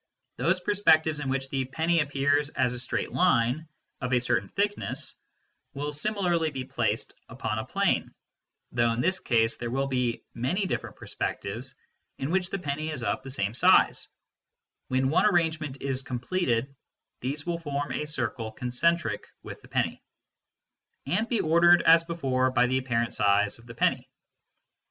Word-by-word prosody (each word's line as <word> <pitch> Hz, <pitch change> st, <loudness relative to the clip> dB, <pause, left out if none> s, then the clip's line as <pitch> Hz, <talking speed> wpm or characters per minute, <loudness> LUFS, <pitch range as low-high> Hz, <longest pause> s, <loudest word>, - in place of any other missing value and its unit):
Those 180 Hz, +3 st, +2 dB
perspectives 160 Hz, -6 st, +3 dB
in 140 Hz, -2 st, -3 dB
which 135 Hz, 0 st, -1 dB
the 135 Hz, -1 st, 0 dB
penny 165 Hz, +6 st, +1 dB
appears 145 Hz, 0 st, +1 dB
as 125 Hz, -3 st, 0 dB
a 125 Hz, -, -3 dB
straight 125 Hz, -, -2 dB
line 155 Hz, -3 st, +2 dB, 0.3 s
of 125 Hz, 0 st, -2 dB
a 125 Hz, -, +5 dB
certain 100 Hz, -5 st, 0 dB
thickness 205 Hz, +1 st, -2 dB, 0.6 s
will 145 Hz, +1 st, -3 dB
similarly 175 Hz, -1 st, 0 dB
be 135 Hz, -3 st, -5 dB
placed -, -, -1 dB, 0.2 s
upon -, -, -3 dB
a -, -, -4 dB
plane -, -, 0 dB, 0.6 s
(though 120 Hz, -1 st, +2 dB
in 115 Hz, -, -1 dB
this 185 Hz, +5 st, +1 dB
case 115 Hz, -2 st, +1 dB
there 120 Hz, -, -4 dB
will 135 Hz, +3 st, 0 dB
be 125 Hz, -3 st, -1 dB
many 175 Hz, -, -1 dB
different -, -, -3 dB
perspectives -, -, -4 dB, 0.4 s
in 135 Hz, +4 st, -3 dB
which 185 Hz, -1 st, +1 dB
the -, -, -2 dB
penny 155 Hz, -3 st, -3 dB
is 145 Hz, -6 st, -4 dB
of -, -, -1 dB
the 135 Hz, -, -9 dB
same 100 Hz, -6 st, -1 dB
size; 120 Hz, -, +4 dB, 0.8 s
when 130 Hz, +1 st, +1 dB
one 170 Hz, -, +4 dB
arrangement 160 Hz, -7 st, 0 dB
is 135 Hz, -1 st, -1 dB
com 125 Hz, -2 st, -4 dB
pleted 130 Hz, -4 st, -1 dB, 0.5 s
these 140 Hz, +4 st, -4 dB
will 170 Hz, -1 st, -2 dB
form 145 Hz, -3 st, -3 dB
a 150 Hz, -, -3 dB
circle 115 Hz, -6 st, -3 dB
concentric 125 Hz, +1 st, 0 dB, 0.2 s
with -, -, -9 dB
the -, -, -16 dB
penny), -, -, -1 dB, 1.0 s
and 205 Hz, -, -1 dB
ordered 170 Hz, +2 st, +5 dB
as 165 Hz, 0 st, +7 dB
before 135 Hz, -6 st, 0 dB
by 125 Hz, -1 st, +3 dB
the 130 Hz, +1 st, +1 dB
apparent 120 Hz, -2 st, -1 dB
size 105 Hz, +1 st, +2 dB
of 115 Hz, -, -17 dB
the 115 Hz, -, -10 dB
penny. -, -, +1 dB
140 Hz, 160 wpm, -27 LUFS, 125-165 Hz, 1.0 s, as